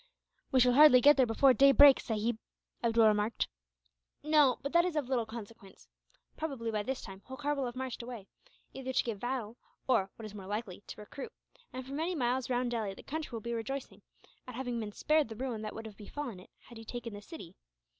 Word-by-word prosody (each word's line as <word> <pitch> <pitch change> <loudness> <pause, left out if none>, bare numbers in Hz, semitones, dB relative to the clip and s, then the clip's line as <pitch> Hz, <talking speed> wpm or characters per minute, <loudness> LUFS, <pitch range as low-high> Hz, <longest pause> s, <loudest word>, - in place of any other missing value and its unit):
"We 260 - +4
shall 250 0 +5
hardly 285 -2 +8
get 290 +4 +7
there 260 -3 +3
before 255 +4 +5
day 275 +2 +6
breaks, 280 0 +7
sahib," 220 0 -1 0.4
Abdool 230 -1 +4
remarked. 210 +1 +2 0.8
"No; 300 -4 +4
but 280 - -4
that 340 0 +5
is 360 -2 -2
of 295 -5 -1
little 240 -4 0
consequence. 220 -3 -11 0.5
Probably, 270 -8 -4
by 215 -1 -1
this 260 +5 -4
time, 195 -2 -10
Holkar 285 +3 -2
will 275 -3 -2
have 240 - -7
marched 255 -1 -5
away 235 -4 -8 0.5
either 260 -1 -5
to - - +2
give 225 -4 -4
battle 240 -2 -4 0.3
or, 195 -7 +2
what 225 - -9
is 215 - -9
more 195 -2 -9
likely, 205 -2 -4
to - - -9
recruit; 235 +6 -8 0.4
and 255 0 -7
for 270 - -8
many 330 +5 -1
miles 255 -2 0
round 245 -1 0
Delhi 215 -5 -2
the - - -13
country 315 +1 -5
will 225 - -5
be 235 +2 -4
rejoicing, 250 +4 -5 0.5
at 250 - -8
having 245 -2 -3
been 215 -2 -4
spared 305 +4 +1
the 220 - -7
ruin 240 -2 -4
that 215 -1 -6
would 225 - -7
have 210 -2 -10
befallen 235 -1 -6
it, 180 - -16
had 235 -2 -13
he - - -9
taken 235 0 -6
the 205 - -8
city. 205 - -11
245 Hz, 215 wpm, -32 LUFS, 220-270 Hz, 0.8 s, hardly